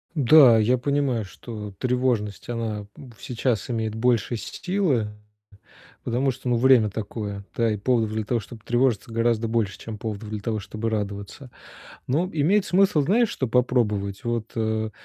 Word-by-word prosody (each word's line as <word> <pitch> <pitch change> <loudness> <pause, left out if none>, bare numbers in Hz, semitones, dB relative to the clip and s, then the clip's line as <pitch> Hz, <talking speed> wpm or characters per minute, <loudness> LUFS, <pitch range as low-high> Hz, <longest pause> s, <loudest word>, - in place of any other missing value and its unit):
Да, 140 -4 +7
я 115 +4 +3
понимаю, 135 -4 0
что 105 +1 -8
тревожность 125 -6 -1
она 110 -3 -3
в 125 -5 -13
сейчас 120 -2 -2
имеет 110 -2 -2
больше 120 +1 +1
силы, 145 - -1 1.0
потому 125 +3 +1
что, 125 0 -6
ну, 120 - +2
время 120 -3 +5
такое, 100 -1 -5
да. 115 -1 +2
И - - -1
поводов 110 0 +1
для 110 0 -2
того, 115 +2 0
чтобы 110 0 -12
тревожиться 120 -2 +1
гораздо 115 0 +1
больше, 110 -4 -1
чем 110 -2 -7
поводов 105 0 -5
для 105 -1 -4
того, 110 +1 -2
чтобы 110 +2 -4
радоваться. 105 +5 -5 0.6
Но 165 +8 0
имеет 180 +7 +2
смысл, 190 -4 +3
знаешь, 220 - +3
что 130 - -2
попробовать? 110 -4 0
Вот, 115 -1 -2
э, 110 -1 -1
115 Hz, 155 wpm, -24 LUFS, 110-130 Hz, 1.0 s, Да